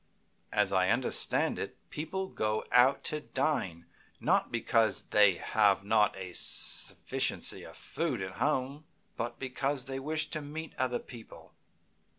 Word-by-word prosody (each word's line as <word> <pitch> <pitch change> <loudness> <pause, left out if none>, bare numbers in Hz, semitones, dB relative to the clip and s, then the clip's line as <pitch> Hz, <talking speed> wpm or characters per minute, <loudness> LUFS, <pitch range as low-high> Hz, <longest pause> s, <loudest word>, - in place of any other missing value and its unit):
As - - +2
I 95 -1 +3
understand 120 +4 +1
it, - - -5
people 175 +5 -3
go 110 -11 -1
out 125 +3 +5
to 150 0 -2
dine 130 - -1 0.3
not - - +2
because 115 -2 +2
they 105 -3 +5
have 100 0 +2
not 105 0 +3
a 95 -2 -7
sufficiency - - -1
of - - -11
food 160 -8 -2
at 95 +1 -6
home, 140 +1 0 0.3
but 120 +1 -3
because 135 +1 -2
they 135 0 -4
wish 155 +3 0
to 155 - 0
meet 155 +2 -6
other 125 -1 +1
people. 120 -2 -12
125 Hz, 140 wpm, -31 LUFS, 105-145 Hz, 0.3 s, out